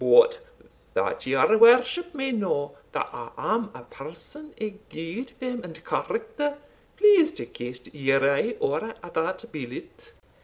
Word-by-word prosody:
But 485 0 +7 0.6
that - - -1
your 220 0 +4
worship 255 +9 +6
may 270 -1 -1
know 185 -11 -1 0.2
that - - -1
I - - -7
am 220 0 0
a 125 - -10
person 165 - -10
of 210 -1 -6
good 170 +11 -5
fame 250 -2 -4
and 165 -1 -11
character, 440 -11 -2 0.4
please 390 -6 +7
to - - -6
cast 125 +1 -8
your 135 -2 +3
eye 215 +11 +1
over 160 +11 -1 0.2
that 185 +8 -2
billet." 130 -5 -8
225 Hz, 140 wpm, -26 LUFS, -, 0.6 s, But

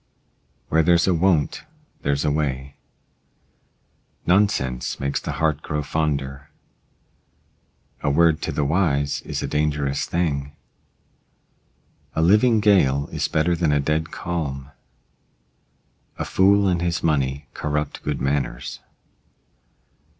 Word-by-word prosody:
Where 80 - +4
there's 85 +1 +4
a 95 - +3
won't 85 -3 +1 0.4
there's 70 0 0
a 75 - +2
way. 70 -2 -2 1.5
Nonsense 85 -10 +1
makes 70 0 -1
the - - -4
heart 80 -2 0
grow 75 -1 -3
fonder. 70 -3 -2 1.5
A - - 0
word 80 +2 +3
to - - -2
the 75 - -1
wise 70 -3 +1
is - - -4
a - - -2
dangerous 75 -2 0
thing. 70 -5 -2 1.6
A 80 - +1
living 110 +6 +4
gale 70 -10 +3
is - - -1
better 80 +3 +1
than 80 -3 +1
a 75 - +3
dead 75 +3 -1
calm. 75 -6 -4 1.5
A - - -3
fool 100 +1 +4
and 90 -2 +1
his 85 -2 -1
money 70 -2 0
corrupt 75 -1 -3
good 75 -1 -3
manners. 65 -3 -2
75 Hz, 115 wpm, -23 LUFS, 70-85 Hz, 1.6 s, Where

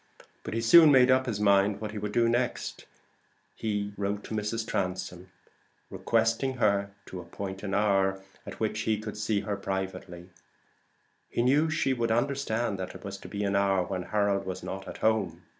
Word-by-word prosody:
But - - -6
he 115 - 0
soon 155 +7 +8
made 130 -1 +6
up 130 0 +3
his 110 -4 -2
mind 100 0 +3
what 105 0 -5
he 105 - -5
would 105 0 -4
do 115 +2 +3
next. 120 +2 -2 0.7
He 105 -2 -2
wrote 100 0 -2
to - - -7
Mrs. 110 +1 -2
Transome 90 -1 -3 0.6
requesting 115 +3 0
her 100 -4 +1 0.2
to 95 - -8
appoint 95 +2 -7
an 100 -1 -3
hour 95 -2 +2 0.2
in - - -8
which 110 -1 -2
he 110 -1 0
could 110 0 -6
see 105 -1 0
her 105 0 -3
privately: 95 -2 -5 1.0
he 120 - 0
knew 145 +6 +3
she 155 -4 +1
would 115 -2 -1
understand 120 -4 0
that 95 0 -5
it - - -11
was 100 0 -6
to - - -10
be 105 0 -4
an 100 0 0
hour 100 -2 +2
when 95 0 -4
Harold 100 0 0
was 95 -1 -6
not 95 0 -6
at - - -7
home. 95 -6 +1
105 Hz, 185 wpm, -28 LUFS, 95-115 Hz, 1.0 s, soon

